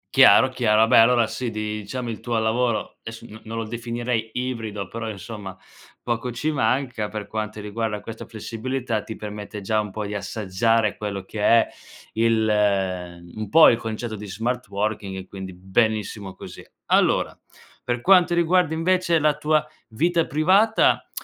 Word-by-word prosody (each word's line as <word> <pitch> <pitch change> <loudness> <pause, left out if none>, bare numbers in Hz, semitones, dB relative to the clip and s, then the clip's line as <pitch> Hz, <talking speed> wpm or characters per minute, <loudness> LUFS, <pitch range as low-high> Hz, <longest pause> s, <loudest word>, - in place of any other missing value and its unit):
Chiaro, 135 0 +8
chiaro, 115 -4 +3
vabbè 115 +2 +5
allora 115 -1 +5
sì, 125 -2 -4
diciamo, 105 +3 -4
il 110 - -6
tuo 120 -2 -1
lavoro, 115 +1 -1
esso 115 +1 -9
non 110 +1 -12
non 115 +1 -6
lo 115 - -2
definirei 115 0 -3
ibrido 115 -6 -4
però, 115 +1 -5
insomma, 100 -2 -8 0.4
poco 120 +1 -2
ci 150 +7 -2
manca 125 -4 0
per 105 -2 -6
quanti 110 0 -4
riguarda 105 0 -3
questa 115 +1 -8
flessibilità 115 +1 -4
ti 110 - -8
permette 105 0 -7
già 110 +2 0
un 105 - -6
pò 105 +1 -4
di 105 0 -5
assaggiare 105 +2 0
quello 100 -2 -4
che 105 +2 -6
è 115 +2 +5 0.5
il 115 0 +2 0.9
un 110 -2 -5
pò 160 +7 +8
il 115 - +2
concetto 110 0 -5
di 105 0 -8
smart 120 +5 -3
working, 100 -2 -3
quindi 95 -1 -8
benissimo 100 +1 -1
così. - - -11 0.2
Allora, - - +2 0.5
per 120 0 -1
quanto 180 +3 +5
riguarda 170 -1 +2
invece 170 +1 +2
la 150 -1 +2
tua 155 0 +1 0.2
vita 165 +9 +1
privata, 190 +9 +3
115 Hz, 155 wpm, -23 LUFS, 105-125 Hz, 0.9 s, Chiaro